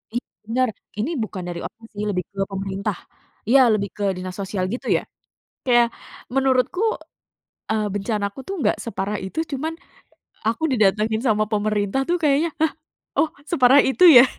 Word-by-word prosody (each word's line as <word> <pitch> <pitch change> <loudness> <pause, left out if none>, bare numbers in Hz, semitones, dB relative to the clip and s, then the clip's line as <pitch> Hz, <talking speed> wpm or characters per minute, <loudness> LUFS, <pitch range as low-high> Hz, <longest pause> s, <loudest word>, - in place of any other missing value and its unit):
I - - +3 0.3
bener, 250 +3 +1 0.3
ini 230 +10 -1
bukan 195 -4 -5
dari 170 -1 -5
ormas 225 0 -10
sih 205 0 -4
lebih 180 -3 -1
ke 195 -1 -5
pemerintah, 195 0 -3 0.5
iya 260 -1 +7
lebih 200 -2 0
ke 205 - -3
dinas 185 0 -5
sosial 195 -1 -2
gitu 250 - -5
ya? - - -4 0.6
Kayak 240 -2 +5 0.4
menurutku 265 - +2 0.9
e - - +2 0.2
bencanaku 205 +2 -2
tuh 390 - -3
nggak 210 - +2
separah 210 -2 -2
itu, 190 +11 -3
cuman 310 +4 -2 0.7
aku 230 +7 0
didatangin 215 -1 +2
sama 215 -3 +3
pemerintah 210 +2 0
tuh 350 - +3
kayaknya, 300 +2 +3
hah? 320 -1 +3 0.5
Oh 320 - +3 0.2
separah 270 -3 +6
itu 265 +7 +3
ya? 245 -2 +10
220 Hz, 155 wpm, -22 LUFS, 200-260 Hz, 0.9 s, ya